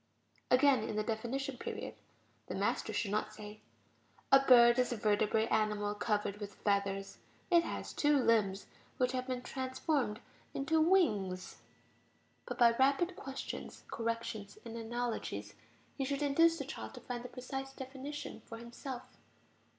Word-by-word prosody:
Again, 260 -1 +5
in - - -3
the 215 - +1
definition 245 +5 -2
period, - - -5 0.5
the - - -4
master - - 0
should 200 - -1
not 215 +1 0
say: 210 0 -9 0.7
"A 270 - +9
bird 240 -2 +7
is 250 - +2
a 240 - -1
vertebrate 215 +1 +2
animal 210 -1 +1
covered 210 -1 -1
with 205 -1 -7
feathers; 200 -1 -1 0.3
it 340 -1 +6
has - - -5
two 295 0 +3
limbs 215 -6 +2 0.3
which 250 -2 +2
have 255 0 -2
been 250 -1 -3
transformed 260 -3 -1 0.4
into 315 +4 +2
wings," 210 - +2 0.9
but - - -4
by 235 -2 +7
rapid 280 +7 +3
questions, 270 -4 -6
corrections, 230 -3 -3
and 230 0 -7
analogies, 235 +1 -3 0.4
he 275 - -2
should 280 +2 -1
induce 330 +4 +4
the - - -4
child - - -7
to - - -9
find 245 -1 -5
the 250 - -7
precise 270 +1 -5
definition 270 +2 -7
for 230 - -7
himself. 240 +2 -7
240 Hz, 145 wpm, -34 LUFS, 215-270 Hz, 0.9 s, A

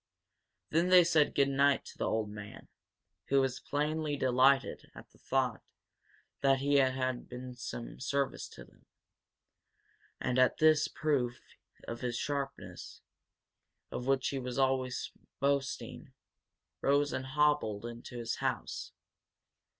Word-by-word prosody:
Then 170 +3 +2
they 180 -1 +8
said 160 -3 +3
good 140 -1 +4
night 140 0 +3
to - - -12
the - - 0
old 110 -2 -1
man, 105 0 -10 0.6
who, 135 -1 +3 0.2
plainly 150 0 0
delighted 130 +1 +3
at - - -12
the - - -24
thought 130 -4 0 0.8
that 135 -1 +4
he 140 +1 +2
had 130 -2 +1
been 125 +1 -7
of 125 0 -12
some 120 -1 -6
service 140 +1 -1
to - - -12
them, - - -25 1.3
and 125 0 0
at 130 - +4
this 155 -1 +5
proof 130 -6 -1 0.5
of 115 0 -5
his 120 -2 -2
sharpness, 140 -2 -5 0.9
of 125 - -4
which 135 -1 +2
he 135 - -2
was 125 -1 -5
always 130 -1 0 0.3
boasting, 140 0 -2 0.7
rose 145 +1 +2
and 130 - -3
hobbled 140 -7 +1
into 120 +1 -8
his 115 -1 -3
house. - - -3
135 Hz, 130 wpm, -32 LUFS, 125-145 Hz, 1.3 s, they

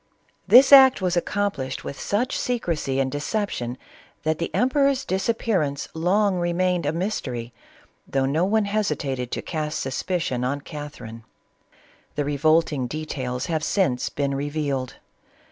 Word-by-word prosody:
This 265 +3 +8
act 265 -1 +9
was 180 -2 0
accomplished 175 -7 -2
with 140 - -7
such 240 +6 -1
secrecy 165 - -1
and 130 -1 0
deception, 145 - -3 0.5
that 155 +1 0
the 170 - -2
emperor's 275 +1 +2
disappearance 190 -7 -1
long 190 +4 +2
re 175 0 0
mained 180 -3 +1
a - - +2
mystery, 130 - -3 0.5
though 135 -1 0
no 150 +5 +1
one 210 +2 +2
hesitated 150 - -2
to - - -4
cast 155 -1 -3
sus 130 -1 -3
picion 170 -9 -1
on 140 +3 -1
Catherine. 145 -7 -9 0.9
The 145 - -1
revolting 145 -2 +2
details 130 -4 -4
have 160 -3 -2
since 150 -12 +1
been 140 -1 -2
revealed. 140 -2 -2
155 Hz, 135 wpm, -24 LUFS, 135-195 Hz, 0.9 s, act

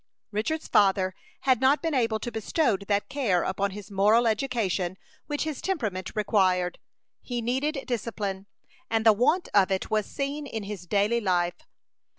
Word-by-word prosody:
Richard's 265 +10 -2
father 190 -2 +3 0.3
had 260 -3 +3
not 275 +5 +4
been 325 -2 0
able 230 -4 +1
to 240 - -4
bestow 225 +3 +1
that 200 +1 -1
care 220 -12 +1
upon 195 +1 -1
his 205 +1 -9
moral 210 +5 +4
education 215 -6 0 0.3
which 295 -1 -1
his 310 -3 -4
temperament 215 - -3
required. 190 -4 +1 0.4
He 245 -1 -4
needed 265 +5 -1
discipline, 205 -5 -3 0.4
and 225 0 0
the 220 - +8
want 280 - +2
of 195 -2 +5
it 190 -1 -2
was 215 -1 +1
seen 285 +1 -3
in 220 -5 -5
his 200 -3 -7
daily 210 +5 +2
life. 175 -3 0
215 Hz, 160 wpm, -27 LUFS, 195-260 Hz, 0.4 s, the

